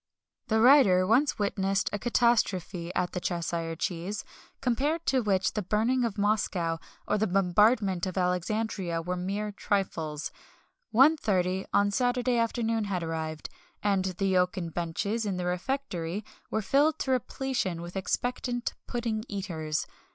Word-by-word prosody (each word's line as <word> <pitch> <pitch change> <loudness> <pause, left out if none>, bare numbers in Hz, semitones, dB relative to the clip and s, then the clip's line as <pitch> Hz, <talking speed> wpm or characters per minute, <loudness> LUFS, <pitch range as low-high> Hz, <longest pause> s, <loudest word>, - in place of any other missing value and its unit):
The 220 0 +2
writer 225 -8 +6
once 250 +9 +3
witnessed 195 -1 0
a 205 - -1
catastrophe 200 -7 +1
at 180 - 0
the 180 - -3
"Cheshire 170 -2 -2
Cheese," 180 +5 -3 0.3
compared 280 +6 0
to 260 -1 +2
which 190 -4 +1
the 210 - -1
burning 225 +6 +1
of 225 -3 -2
Moscow 190 -5 0 0.3
or 210 - +1
the 220 - +2
bombardment 195 0 +3
of 185 - -5
Alexandria 180 0 -1
were 180 +2 -2
mere 200 +4 -2
trifles. 170 -8 -2 0.6
1.30 205 - +3
on 205 0 +3
Saturday 245 +1 +1
afternoon 230 -1 0
had 185 -4 -2
arrived, 160 -1 -4 0.3
and 195 -2 +2
the 190 +1 0
oaken 180 -1 0
benches 175 +7 -2
in 200 -3 -2
the 180 - -2
refectory 180 -1 -2 0.2
were 220 - -1
filled 290 +9 +3
to 265 - -2
repletion 255 -7 -1
with 175 +2 -8
expectant 245 +5 -2
pudding 230 -3 -2
eaters. 160 -6 -3
200 Hz, 135 wpm, -28 LUFS, 180-230 Hz, 0.6 s, writer